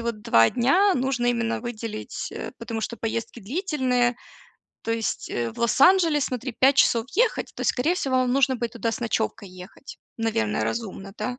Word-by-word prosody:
вот 230 -2 -4
2 115 - +5
дня 360 +12 +3
нужно 255 -2 0
именно 235 -1 0
выделить, 225 -2 -6
э, - - -6
потому 225 -2 -5
что 235 - -4
поездки 230 +1 -4
длительные. 250 - 0 0.7
То - - -4
есть, 225 -1 -3
э, 120 -1 -2
в - - -15
Лос-Анджелес, 295 - +4
смотри, 250 0 -4
5 270 +1 +5
часов 230 -3 +3
ехать, 460 +4 +1
то - - -5
скорее 305 +8 +1
всего 270 -8 -1
вам 255 -1 +2
нужно 265 -1 +3
будет 235 -1 -3
туда 230 -1 -2
с - - -5
ночевкой 220 -3 -2
ехать. 185 +8 -12 0.2
Наверное, 110 - -1
разумно, 195 - -5
да? 250 0 -4
240 Hz, 175 wpm, -24 LUFS, 225-265 Hz, 0.7 s, 2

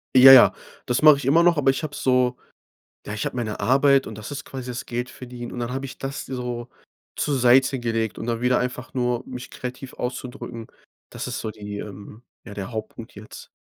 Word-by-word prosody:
Ja, 130 +1 +11
ja, 130 - +9 0.3
das 125 - 0
mache 150 -2 +8
ich 140 - -6
immer 150 +6 +5
noch, 170 -2 +4
aber 135 -2 +4
ich 135 - -4
habe 150 -2 -5
so 125 -1 +2 0.7
ja, 105 - -5
ich 105 - -3
habe - - -4
meine 110 -3 -3
Arbeit 135 +5 +4
und 110 - -8
das 110 +7 -8
ist 145 - -6
quasi 130 -2 -6
das 125 - -6
Geldverdienen. 125 0 -6
Und 120 - -5
dann 120 +1 -3
habe 135 +1 -3
ich 130 - -9
das 135 +2 -5
so 125 -2 -5 0.5
zur 145 -2 0
Seite 130 +2 +4
gelegt 115 -2 -2
und - - -5
dann 115 -1 -2
wieder 125 0 +3
einfach 125 +1 -4
nur 125 -2 -1
mich 125 -1 -8
kreativ 125 +1 -7
auszudrücken, 125 -2 -6 0.4
das - - -6
ist - - -4
so 110 - -4
die, 105 -1 -7
ähm 105 +3 -10 0.2
ja, 105 - -9
der 100 +2 -6
Hauptpunkt 110 +1 -7
jetzt. 105 +1 -11
125 Hz, 210 wpm, -23 LUFS, 115-135 Hz, 0.7 s, Ja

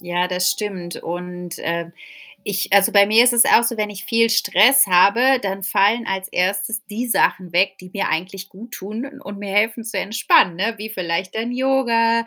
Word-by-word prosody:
Ja, 175 0 -2
das 180 0 0
stimmt 185 -5 -5
und, 180 0 -7
ähm, 170 0 -4 0.5
ich 195 -1 -3
also 200 -1 +4
bei 200 -1 +5
mir 220 +3 +5
ist 245 0 +4
es 235 -1 +5
auch - - +4
so, 235 0 -2
wenn 210 -1 -2
ich 195 -2 -9
viel 230 -3 +2
Stress 225 +2 +4
habe, 230 +9 +4
dann 195 0 -4
fallen 210 +5 +1
als 190 -1 -3
1. 195 +5 -2
die 225 +4 -5
Sachen 185 -6 0
weg, 190 +2 +1
die 185 - -13
mir 200 - -2
eigentlich 190 +4 -4
guttun 225 +6 -9
und 200 -4 -9
mir 200 -1 -7
helfen 220 +2 0
zu 225 -2 -6
entspannen, 190 -3 +2
ne, 215 +5 -2
wie 215 +2 -8
vielleicht 185 -1 -4
dann 230 +2 -3
Yoga, 235 -3 +1
200 Hz, 190 wpm, -19 LUFS, 185-230 Hz, 0.5 s, bei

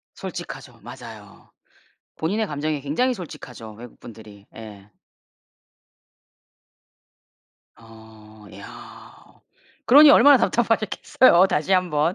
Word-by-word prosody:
솔직하죠. - - -10
맞아요. - - -14 0.7
본인의 210 +7 -3
감정에 150 0 -4
굉장히 160 - -1
솔직하죠, 125 - -11
외국분들이. 110 -2 -15
예. 105 -3 -13 2.9
어 110 -1 -18
야. 100 - -14 0.7
그러니 290 +4 +7
얼마나 285 0 +6
답답하셨겠어요, 225 -4 +1
다시 155 +4 -2
한번. 170 -3 0
150 Hz, 220 characters per minute, -21 LUFS, -, 2.9 s, 그러니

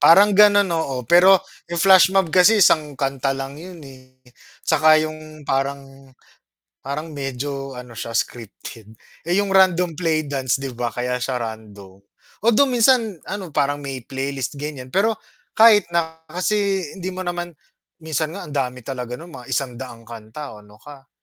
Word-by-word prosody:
Parang 200 +5 +7
ganun, 205 -2 +5
oo 135 -6 -2
pero, 180 +7 +5 0.2
yung 170 - -4
flashmob 190 -1 +5
kasi 190 +2 +6
isang 150 -3 +2
kanta 135 0 -1
lang 135 +2 -7
yun 175 -3 -11
eh, 130 -1 -16 0.5
tsaka 155 0 +5
yung 155 -1 -5
parang 135 0 -3 0.7
parang 150 +4 -6
medyo 135 -1 -5
ano, 125 -1 -10
siya 115 0 -6
scripted. 115 -1 -6 0.3
Eh, 175 - +1
yung 200 - -4
random 180 -2 +4
play 160 -1 -1
dance 135 -4 -1
'di 135 -1 -5
ba, 120 0 -3
kaya 125 +2 -3
siya 125 +1 -2
random, 105 -5 -8 0.5
although 235 +4 +5
minsan 240 - +2
ano 190 -5 -6
parang 145 0 -1
may 135 -2 -5
playlist 135 0 -4
ganyan 140 -3 -6
pero 210 +10 0 0.3
kahit 215 -5 +5
na 160 -1 -2
kasi 195 +2 0 0.2
hindi 185 0 -5
mo 185 0 -6
naman 175 0 -4 0.5
minsan 155 -1 -3
nga 195 0 -8
ang 150 - -9
dami 125 -2 -2
talaga 125 -2 -5
no'n 170 +2 -11
mga - - -16
100 125 -3 -5
kanta 115 +4 -9
o 105 - -15
ano 105 +1 -19
ka. 140 +1 -14
145 Hz, 160 wpm, -21 LUFS, 130-175 Hz, 0.7 s, Parang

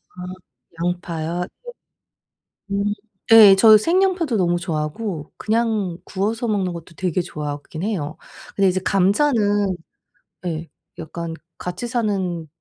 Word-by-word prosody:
아. 180 - -12 0.6
양파요? 175 -1 -2 1.2
네. 200 - -1
음 205 +1 +1 0.4
예. 215 -3 +10
저 215 +2 +8
생양파도 340 - +2
너무 175 -2 +2
좋아하고 160 +1 -3
그냥 215 -5 0
구워서 220 +5 -2
먹는 195 -5 0
것도 170 0 -10
되게 180 -1 0
좋아하긴 150 0 -6
해요. 175 -8 -2 0.4
근데 195 -1 +3
이제 185 +1 0
감자는 205 -1 +2 0.7
예 165 -1 -3 0.3
약간 165 +1 -5 0.2
같이 180 +7 -5
사는 195 -9 -1
190 Hz, 235 characters per minute, -21 LUFS, 170-215 Hz, 1.2 s, 예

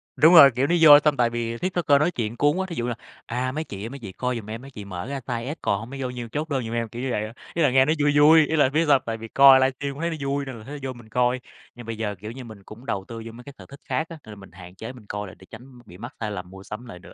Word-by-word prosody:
Đúng 160 +3 +6
rồi, 140 -5 +10
kiểu, 135 +3 +1
nó 175 - +2
vô 145 -2 +10
xong 150 -1 +1
tại 120 -1 +3
vì 115 0 -3
TikToker 175 -5 +1
nói 160 +4 +2
chuyện 115 -5 -4
cuốn 145 +4 +2
quá, 190 - -1
thí 170 - -6
dụ 120 - -3
như - - -2
là, 120 - -3 0.3
à: 125 +2 -2
"Mấy 155 +3 -3
chị 100 -9 -8
ơi - - -5
mấy 140 +1 -9
chị 105 -5 -8
coi 125 +6 -3
giùm 110 -2 -7
em, 115 +2 -6
mấy 135 +1 -12
chị 105 -4 -9
mở 90 +3 -6
ra 140 0 -4
size 120 +3 -4
S - - -14
còn 100 - 0
hông 115 +3 -9
mới 135 0 -7
vô 130 - -2
nhiêu 120 -2 -7
chốt 155 +2 -3
đơn 135 -3 -1
giùm 115 - -5
em", 115 -1 -2
kiểu 120 +3 -7
như 130 - -2
vậy. 105 - -1 0.3
Ý 170 - -1
là 145 - +4
nghe 130 0 +5
nó 155 - +2
vui 145 0 +3
vui, 155 +1 +7
ý 160 - -1
là 145 -4 +4
biết 155 +4 +1
sao 145 - +6
hông? - - 0
Tại 115 0 -3
vì 115 - -9
coi 135 +2 +7
livestream 135 +1 -1
cũng 145 - -9
thấy 170 - 0
nó 160 - -3
vui 140 0 -1
nên 130 - -7
là 110 - -12
thấy 145 +5 -8
nó 135 - -4
vô 130 - -5
mình 120 -2 -15
coi, 125 +2 +1 0.4
nhưng 120 -1 -11
bây 115 -1 -5
giờ, 105 -2 -3
kiểu 105 +3 -7
như, 130 +1 -9
mình 110 -4 -12
cũng 115 +6 -13
đầu 95 -6 -3
tư 115 -1 -8
vô 115 - -8
mấy 120 +2 -13
cái 140 - -11
sở - - -12
thích 140 0 -12
khác 160 +2 -2
á, 165 - -9
nên 110 - -11
là - - -11
mình 95 -3 -14
hạn 90 0 -13
chế 115 +5 -8
mình 120 -4 -15
coi 105 0 -4
lại 90 - -12
để 95 - -15
tránh 125 0 -13
bị 90 - -14
mắc 120 +5 -9
sai 105 -2 -3
lầm 90 -2 -6
mua 95 0 -12
sắm 105 +5 -8
lại 90 -7 -10
nữa. - - -15
125 Hz, 365 wpm, -24 LUFS, 110-140 Hz, 0.4 s, rồi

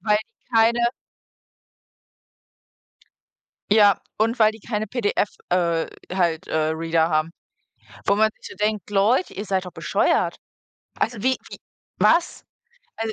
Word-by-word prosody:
Weil 210 +2 +2
die 230 +2 -14
keine 235 +1 +4 2.9
Ja, 205 -2 +6 0.2
und 225 +3 0
weil 215 0 +6
die 220 - -13
keine 215 -1 -3
PDF, 210 -2 0 0.2
äh 170 -2 +1 0.3
halt, 175 -2 0
äh, - - -3
Reader 165 0 +1
haben. 155 0 0 0.7
Wo 200 - +3
man 215 +1 +4
sich - - -10
so - - -11
denkt: 210 -2 -1
„Leute, 210 - +2
ihr 205 - -5
seid 190 -1 -1
doch 180 - -8
bescheuert.“ - - 0 0.6
Also, 225 -3 -1
wie 260 0 +2
wie - - -9 0.4
was? 335 +1 +2 0.5
Al 225 0 -3
210 Hz, 135 wpm, -23 LUFS, 180-225 Hz, 2.9 s, Ja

